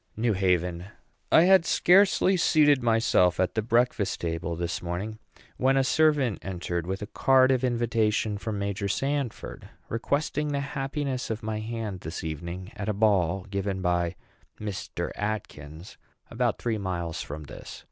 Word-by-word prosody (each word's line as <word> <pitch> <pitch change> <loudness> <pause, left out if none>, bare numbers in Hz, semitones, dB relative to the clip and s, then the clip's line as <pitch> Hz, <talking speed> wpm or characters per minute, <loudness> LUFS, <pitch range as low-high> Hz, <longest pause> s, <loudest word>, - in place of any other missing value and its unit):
NEW 115 0 +1
HAVEN. 90 -2 0 0.5
I 160 - +7
had 190 -1 +6
scarcely 190 +2 +4
seated 150 -5 +4
myself 115 -7 +3
at 95 - +1
the 110 - 0
breakfast 115 -3 +1
table 85 0 -3
this 85 +2 -3
morning 95 +6 -4 0.4
when 135 +1 +3
a 135 - +4
servant 145 -5 +2
entered 85 -2 -4
with 95 +2 -3
a - - -3
card 130 +4 +4
of 130 -1 +1
invitation 115 -3 0
from 110 -1 -4
Major 100 0 -2
Sanford, 135 +3 -3 0.2
requesting 145 +5 -1
the 145 -1 -1
happiness 140 -1 -3
of 110 -1 -4
my 110 0 -2
hand 110 -3 -4
this 80 0 -6
evening 85 +5 -6
at 105 +1 -4
a - - +1
ball 100 -3 +2
given 100 -1 -2
by 85 -1 0 0.4
Mr. 105 -3 -4
Atkins, 85 -6 -5 0.3
about - - 0
three 115 -3 -2
miles 85 -4 -3
from 75 +2 -7
this. 70 - -10
105 Hz, 150 wpm, -27 LUFS, 90-130 Hz, 0.5 s, I